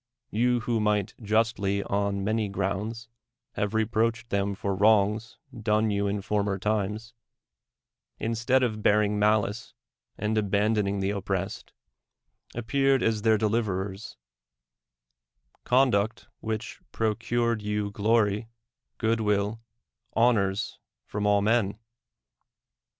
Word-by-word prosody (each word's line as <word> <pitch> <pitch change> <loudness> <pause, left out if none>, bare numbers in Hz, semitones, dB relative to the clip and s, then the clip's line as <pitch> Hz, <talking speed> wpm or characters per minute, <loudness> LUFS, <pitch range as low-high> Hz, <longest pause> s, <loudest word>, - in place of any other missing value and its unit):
— - - -53
You, 120 +2 +2
who 115 -1 0
might 105 -1 +1
justly 105 -2 +1
on 100 0 -1
many 110 0 0
grounds 100 +4 -3 0.4
have 105 +1 -2
reproached 115 +1 0
them 100 0 0
for 100 0 -2
wrongs 105 +2 +2 0.2
done 110 -1 +1
you 100 0 0
in 100 0 -2
former 100 -1 0
times, 105 +2 -2 1.0
instead 115 +3 +1
of 110 -3 -1
bearing 105 0 +3
malice 105 +2 +1 0.4
and 105 +1 -1
abandoning 105 -1 +1
the 95 +1 0
oppressed, 95 -1 -3 0.8
appeared 135 +3 +2
as 110 -1 +1
their 110 0 +4
de 110 +1 +1
liverers; 100 -2 -2 1.5
conduct 115 -5 +2
which 110 +1 -5
procured 115 +1 0
you 105 0 -2
glory, 105 +1 +1 0.5
good 115 -1 +1
will, 105 +1 0 0.5
honors 110 -3 +1 0.3
from 105 0 -2
all 100 -1 +3
men. 105 -2 +2
105 Hz, 110 wpm, -27 LUFS, 100-115 Hz, 1.5 s, their